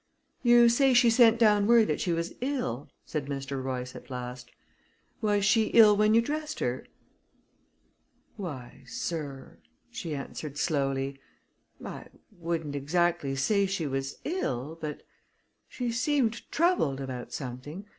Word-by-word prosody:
"You 240 -1 +6
say 255 +2 +4
she 240 -1 +6
sent 230 -1 +6
down 210 -3 +4
word 235 -1 +6
that 150 - -1
she 175 - 0
was 170 +1 -2
ill?" 250 - -2 0.2
said 150 -3 -4
Mr. 135 -1 -4
Royce, 125 -1 -4
at - - -11
last. 125 -1 -6 0.7
"Was 205 -2 +2
she 220 +1 +4
ill 215 -3 +8
when 215 +1 +4
you 230 - +5
dressed 305 +3 -4
her?" - - -2 1.5
"Why, 140 - -7
sir," 140 -3 -5 0.3
she 160 -3 -5
answered 140 +1 -6
slowly, 135 -3 -1 0.7
"I - - -7 0.2
wouldn't 165 -5 -4
exactly 165 0 0
say 200 +9 +2
she 190 -4 -2
was 135 0 -3
ill, 160 - -3
but 150 -1 -5 0.7
she 245 -2 -3
seemed 240 -2 0
troubled 320 - +2
about 130 -2 -6
something. 145 +8 -7
170 Hz, 135 wpm, -28 LUFS, 135-230 Hz, 1.5 s, ill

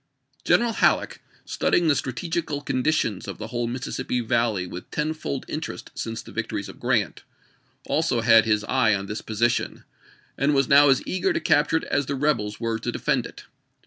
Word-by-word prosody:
General 235 -1 +3
Halleck, - - +1 0.2
studying 175 - +1
the 150 - +4
strategical 150 +3 -3
condi 130 +2 +1
tions 110 -11 -1
of - - -6
the 110 0 -7
whole 120 0 -2
Mississippi 125 0 -3
Valley 115 -5 0
with 90 0 -9
tenfold 150 -3 -3
interest 155 0 -6
since 115 -1 -5
the - - -12
victories - - -3
of - - -12
Grant, - - 0 0.6
also 155 -7 +1
had 115 -1 +6
his 105 -1 +1
eye 110 -2 +2
on 100 0 -4
this 105 +2 -5
position, 115 +2 -1 0.6
and 140 +2 +2
was 135 -2 +3
now 145 +1 +7
as 135 - +3
eager 185 0 0
to - - 0
cap 150 -1 +3
ture 160 - +3
it - - -4
as 140 -2 -1
the 140 - -2
rebels 130 -8 0
were 115 -1 -2
to 120 +1 -3
defend - - 0
it. - - -13
125 Hz, 185 wpm, -24 LUFS, 115-150 Hz, 0.6 s, now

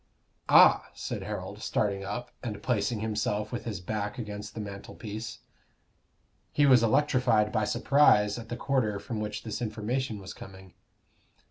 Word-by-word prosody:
"Ah!" - - +7
said - - -4
Harold, - - -6
starting 100 -2 0
up, 120 +5 -5
and 110 -4 -5
placing 110 -2 0
himself 105 -1 -1
with 120 - -4
his 105 -5 -4
back 105 +2 -3
against 105 -3 -6
the - - -5
mantelpiece. 105 +2 -7 1.1
He 145 - +3
was 130 -4 +7
electrified 115 -3 +3
by 110 - +1
surprise 120 -4 +4
at 115 -1 -10
the 120 - -4
quarter 125 -7 0
from 105 +2 -5
which 105 0 -4
this 110 +1 -5
information 115 +2 -2
was 95 -2 -8
coming. 95 -2 -12
110 Hz, 145 wpm, -29 LUFS, 105-120 Hz, 1.1 s, Ah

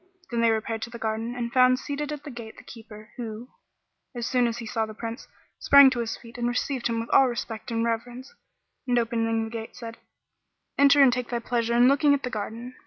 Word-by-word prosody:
Then 235 -1 0
they 230 - +4
repaired 225 0 -1
to 230 - -5
the 235 - -8
garden 225 +1 -3
and 235 -1 -4
found 255 0 +5
seated 290 +2 -4
at 295 -1 -6
the 290 - -8
gate 235 -2 -10
the - - -13
Keeper 215 -2 -13
who, 230 0 -7 0.7
as 240 -1 -3
soon 250 -1 +2
as 230 0 -3
he 235 - -7
saw 220 0 -2
the 215 - -10
Prince, 230 +3 -7 0.3
sprang 280 -1 +7
to 245 - -2
his 225 -1 -3
feet 235 0 -13
and 240 - 0
received 245 +1 -1
him 230 -1 -2
with 230 - -6
all 270 - +6
respect 225 -2 -5
and 230 0 -1
reverence, 240 - -4 0.5
and 245 -1 +2
opening 225 -1 0
the 220 - -6
gate, 225 -1 -7
said, 230 -1 -9 0.8
"Enter 280 0 +6
and 255 -3 +5
take 250 -1 -3
thy 240 - -1
pleasure 235 0 -1
in 240 +1 +6
looking 285 +1 +4
at 280 - -6
the 250 - -3
garden." 225 +4 -6
235 Hz, 230 wpm, -26 LUFS, 225-250 Hz, 0.8 s, sprang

